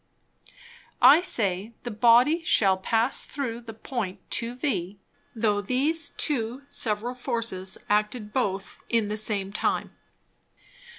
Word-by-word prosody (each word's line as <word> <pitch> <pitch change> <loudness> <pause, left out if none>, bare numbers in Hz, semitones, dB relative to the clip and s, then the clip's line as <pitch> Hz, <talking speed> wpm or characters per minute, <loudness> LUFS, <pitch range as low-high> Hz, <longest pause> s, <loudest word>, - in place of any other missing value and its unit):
I 320 - +8
say, 205 - 0
the 240 - -4
Body 245 +9 +4
shall 200 - +3
pass 225 +6 0
through 240 -5 -4
the 225 -2 -10
Point 215 -5 -4
to 235 +1 -1
V, 200 - -2 0.4
though 210 -2 +1
these 285 +9 0
two 255 -2 -2
several 225 +1 -1
Forces 230 -7 -3
acted 210 +1 0
both 195 -6 -2
in 225 -3 +1
the 210 - -2
same 200 -2 0
time. - - -1
225 Hz, 120 wpm, -26 LUFS, 205-250 Hz, 0.4 s, I